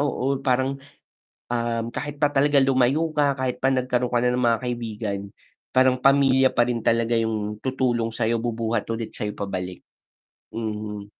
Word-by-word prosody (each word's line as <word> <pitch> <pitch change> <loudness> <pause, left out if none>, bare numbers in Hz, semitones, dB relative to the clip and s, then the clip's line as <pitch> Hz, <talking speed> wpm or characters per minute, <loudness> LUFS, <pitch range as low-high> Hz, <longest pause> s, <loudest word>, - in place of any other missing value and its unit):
oo 140 -1 0
parang 135 +1 0 0.7
um, 115 -1 -1
kahit 145 0 -4
pa - - +7
talaga 145 +1 +3
lumayo 135 +4 +2
ka, 145 -2 +2
kahit 130 -1 -1
pa 135 - +3
nagkaroon 125 -1 0
ka 120 - +3
na 125 - +3
ng 125 0 0
mga 115 - +2
kaibigan, 110 -4 -3 0.5
parang 130 0 +4
pamilya 135 -1 +5
pa 120 - +3
rin 120 -2 -1
talaga 115 0 +2
'yong 110 -1 -2
tutulong 125 -3 0
sayo, 115 +1 0
bubuhat 115 -2 -1
ulit 115 -1 -4
sa - - -4
pabalik. 95 -3 -5 0.7
Mhm. 105 -2 -5
120 Hz, 155 wpm, -24 LUFS, 115-130 Hz, 0.7 s, pa